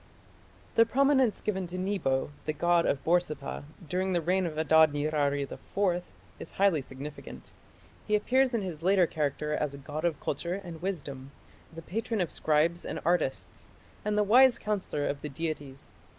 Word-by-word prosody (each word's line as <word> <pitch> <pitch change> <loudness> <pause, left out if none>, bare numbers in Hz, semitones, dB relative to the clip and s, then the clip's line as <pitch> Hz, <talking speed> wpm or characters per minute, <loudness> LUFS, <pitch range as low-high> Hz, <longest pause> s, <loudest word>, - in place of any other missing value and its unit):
The 230 - +9
prominence 265 -2 +3
given 190 -4 -2
to 180 +1 -6
Nebo, 185 -9 -1 0.2
the 155 - 0
god 170 +2 +2
of 140 - 0
Borsippa, 160 -5 0 0.2
during 185 +4 -1
the 175 - +1
reign 180 +2 +1
of 155 -2 -6
Adad 160 0 +5
nirari 145 -1 0
IV 180 +5 -2 0.4
is - - -9
highly 195 -6 +3
significant. 135 +3 -10 0.5
He 210 - +3
appears 255 +4 +2
in 220 - 0
his 170 -5 -6
later 185 +1 +4
character 150 -1 -2
as 150 -2 -1
a - - -9
god 150 +3 -6
of 170 -4 0
culture 170 +5 -2
and 175 -5 -8
wisdom, 140 -8 -4 0.4
the 165 0 -10
patron 220 +5 -2
of 175 -4 -1
scribes 160 +3 +1
and - - -4
artists, 170 -6 -1 0.3
and 210 0 0
the 210 - +4
wise 245 +4 +6
counsellor 200 -10 -2
of 140 - -2
the 150 - -5
deities. 145 -2 -5
170 Hz, 165 wpm, -29 LUFS, 150-195 Hz, 0.5 s, The